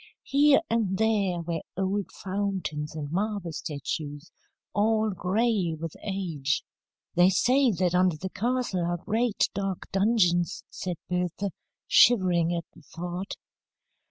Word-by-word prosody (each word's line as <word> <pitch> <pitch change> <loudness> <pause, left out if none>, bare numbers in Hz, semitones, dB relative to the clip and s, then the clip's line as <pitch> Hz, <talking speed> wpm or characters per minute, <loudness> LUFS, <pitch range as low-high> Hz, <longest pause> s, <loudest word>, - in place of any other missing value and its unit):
Here 285 +1 +5
and 215 -7 0
there 200 -5 +1
were 165 -1 -3 0.2
old 195 +1 -1
fountains 185 -6 -3
and 145 -2 -5
marble 200 -1 -1
statues, 145 +1 -5 0.4
all 215 +1 +2
gray 190 -1 +1
with 165 -1 -5
age." 170 -9 -2 0.5
"They 175 +1 +6
say 255 +8 +4
that 180 -1 +1
under 180 -2 +3
the 190 +4 -5
castle 240 -5 -1
are 175 +1 0
great, 220 +5 0
dark 195 -2 -3
dungeons," 190 -5 +2
said 180 -1 -4
Bertha, 180 +2 -1 0.4
shivering 180 -7 +5
at 170 -1 -2
the - - -16
thought. 175 +5 -6
185 Hz, 125 wpm, -27 LUFS, 170-210 Hz, 0.5 s, They